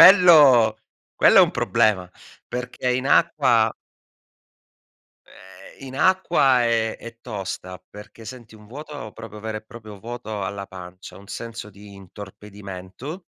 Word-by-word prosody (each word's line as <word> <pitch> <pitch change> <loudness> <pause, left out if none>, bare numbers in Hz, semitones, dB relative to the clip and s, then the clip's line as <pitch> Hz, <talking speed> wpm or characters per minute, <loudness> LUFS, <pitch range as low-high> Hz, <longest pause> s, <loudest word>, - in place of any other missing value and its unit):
Quello 155 - +8 0.4
quello - - +6
è - - +10
un - - +2
problema 95 -4 +1 0.4
perché 125 +1 -4
in 130 +1 -2
acqua 120 -6 +3 1.5
ehm, 95 +8 -15
in 130 0 -9
acqua 150 -7 +3
è 115 -1 0
è 115 0 -12
tosta, 95 -4 -7
perché 105 +2 -13
senti 120 -2 -11
un 105 -1 -16
vuoto 140 -2 -9
proprio 110 -2 -10
vero 110 0 -4
e - - -13
proprio 110 -2 -12
vuoto 110 -1 -6
alla 100 +1 -5
pancia, 90 -1 -11
un 100 - -16
senso 115 0 -7
di 100 0 -14
intorpidimento 100 - -10
110 Hz, 130 wpm, -22 LUFS, 100-125 Hz, 1.5 s, è